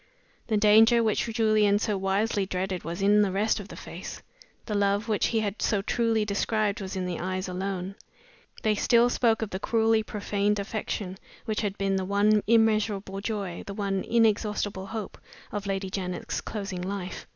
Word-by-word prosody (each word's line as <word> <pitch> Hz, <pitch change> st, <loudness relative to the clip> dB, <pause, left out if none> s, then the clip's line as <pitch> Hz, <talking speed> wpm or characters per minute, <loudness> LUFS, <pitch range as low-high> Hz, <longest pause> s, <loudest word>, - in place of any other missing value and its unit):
The 220 Hz, -, +1 dB
danger 220 Hz, +3 st, +6 dB
which 215 Hz, -2 st, +1 dB
Julian 215 Hz, -3 st, +3 dB
so 210 Hz, 0 st, -1 dB
wisely 195 Hz, +1 st, 0 dB
dreaded 185 Hz, 0 st, -3 dB
was 175 Hz, +4 st, -4 dB
in 205 Hz, +1 st, +5 dB
the 200 Hz, -2 st, +2 dB
rest 210 Hz, +4 st, +1 dB
of 200 Hz, -, -8 dB
the -, -, -10 dB
face; -, -, -8 dB, 0.5 s
the 215 Hz, -, -4 dB
love 205 Hz, +1 st, +1 dB
which 215 Hz, -2 st, +1 dB
he 225 Hz, -2 st, +1 dB
had 205 Hz, 0 st, -3 dB
so 205 Hz, -3 st, +1 dB
truly 225 Hz, -1 st, +1 dB
described 210 Hz, 0 st, 0 dB
was 190 Hz, 0 st, -5 dB
in 185 Hz, -1 st, -2 dB
the 180 Hz, -2 st, -3 dB
eyes 185 Hz, +1 st, -3 dB
alone. 185 Hz, 0 st, -3 dB, 0.7 s
They 215 Hz, -, +3 dB
still 235 Hz, +3 st, +3 dB
spoke 225 Hz, -3 st, +2 dB
of 215 Hz, -, -5 dB
the 190 Hz, -, -3 dB
cruelly 225 Hz, +1 st, +2 dB
profaned 210 Hz, -1 st, -1 dB
affection 200 Hz, -2 st, -4 dB, 0.3 s
which 215 Hz, -1 st, -1 dB
had 205 Hz, -2 st, -2 dB
been 195 Hz, -1 st, 0 dB
the 190 Hz, -, -2 dB
one 205 Hz, +2 st, +3 dB
immeasurable 215 Hz, -3 st, +2 dB
joy, 200 Hz, -5 st, -3 dB
the 200 Hz, -, -6 dB
one 195 Hz, -2 st, -1 dB
inexhaustible 210 Hz, -3 st, +1 dB
hope 220 Hz, -1 st, -6 dB, 0.3 s
of 205 Hz, -1 st, -4 dB
Lady 195 Hz, -1 st, -2 dB
Janet's 180 Hz, -2 st, -3 dB
closing 195 Hz, -4 st, -5 dB
life. 185 Hz, 0 st, -5 dB
205 Hz, 175 wpm, -27 LUFS, 195-220 Hz, 0.7 s, danger